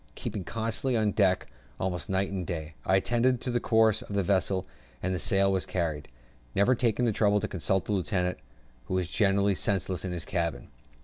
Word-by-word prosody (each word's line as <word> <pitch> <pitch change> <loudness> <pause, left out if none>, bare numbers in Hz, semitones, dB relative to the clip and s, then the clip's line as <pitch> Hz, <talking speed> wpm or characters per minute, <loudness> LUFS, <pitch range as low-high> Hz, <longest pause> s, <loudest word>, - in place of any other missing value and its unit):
Keeping 100 - -4
constantly 115 +5 -1
on 110 -2 +2
deck, 95 -3 +2 0.3
almost 90 -2 -3
night 95 +1 0
and 95 -2 -2
day, 80 -2 -5
I 95 - +4
attended 120 +5 +2
to 125 - -2
the 120 - +1
course 110 -1 +3
of 105 -4 -7
the 100 - +2
vessel 95 0 +1 0.4
and 95 +1 0
the 90 - -1
sail 95 +2 +2
she - - -5
carried, 80 -5 -2 0.5
never 100 +6 +4
taking 120 0 +1
the 115 - +3
trouble 105 0 +3
to - - -2
consult 95 +1 0
the 105 - -1
lieutenant, 90 0 0 0.5
who 95 - -2
was 90 -2 0
generally 100 +1 +2
senseless 95 -1 -1
in 95 - -3
his 85 -3 -3
cabin. 85 -2 -2
95 Hz, 195 wpm, -28 LUFS, 90-110 Hz, 0.5 s, I